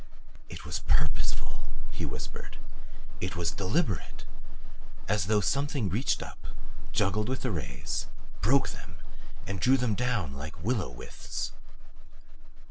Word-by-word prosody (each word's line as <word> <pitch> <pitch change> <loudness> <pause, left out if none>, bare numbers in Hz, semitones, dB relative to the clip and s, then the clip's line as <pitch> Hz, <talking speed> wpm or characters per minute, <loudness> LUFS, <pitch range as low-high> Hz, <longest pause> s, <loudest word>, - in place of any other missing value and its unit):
"It - - -7
was 75 -1 -1
PURPOSEFUL," - - +2 0.2
he - - -1
whispered. - - -5 0.6
"It 90 0 -1
was 85 -1 +1
DELIBERATE. 100 - 0 0.8
As 95 -3 +3
though 105 -1 +5
something 135 - +2
reached 120 - +2
up, - - -9 0.4
juggled 105 +3 +3
with 130 - -1
the 125 - +2
rays, 70 -5 -2 0.3
broke 135 +6 +5
them, 85 - -7 0.5
and 95 0 -2
drew 130 +9 +6
them 125 -4 +2
down 110 - +1
like 75 +3 -6
willow 110 - +2
withes." - - -4
100 Hz, 125 wpm, -31 LUFS, 85-125 Hz, 0.8 s, drew